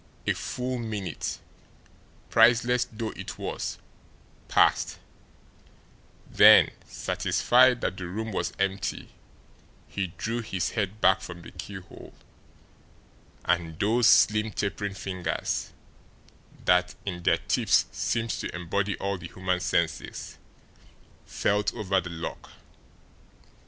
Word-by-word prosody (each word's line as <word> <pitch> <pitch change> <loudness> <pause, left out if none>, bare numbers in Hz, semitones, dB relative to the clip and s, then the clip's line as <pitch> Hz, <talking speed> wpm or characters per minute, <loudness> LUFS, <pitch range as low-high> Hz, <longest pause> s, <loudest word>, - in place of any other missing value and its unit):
A - - +2
full 125 0 -4
minute, 105 -8 -4 0.9
priceless 120 +2 +4
though 110 0 -4
it - - -8
was, - - -4 0.7
passed; - - +3 1.3
then, - - +7 0.2
satisfied - - +3
that 95 - -2
the 90 - -5
room 110 +5 -4
was 90 -3 -2
empty, 100 0 -2 0.8
he 100 -2 -3
drew 115 +2 -2
his 95 -5 -2
head 105 -1 -3
back 95 0 +5
from 85 -1 -9
the - - -11
keyhole, 95 -3 -10 1.3
and 85 -2 0
those 110 +5 +3
slim, 105 +1 +5
tapering 100 -1 -3
fingers, 90 -4 -3 1.0
that 90 0 +3
in 90 -3 -4
their - - +3
tips - - +2
seemed 100 +6 -1
to - - -4
embody 95 +3 -1
all 100 -1 -2
the 85 - -7
human 90 0 -2
senses, 85 -2 -2 0.9
felt 105 +1 0
over 95 -4 +1
the 85 - -7
lock. 85 0 -6
100 Hz, 110 wpm, -27 LUFS, 90-110 Hz, 1.3 s, then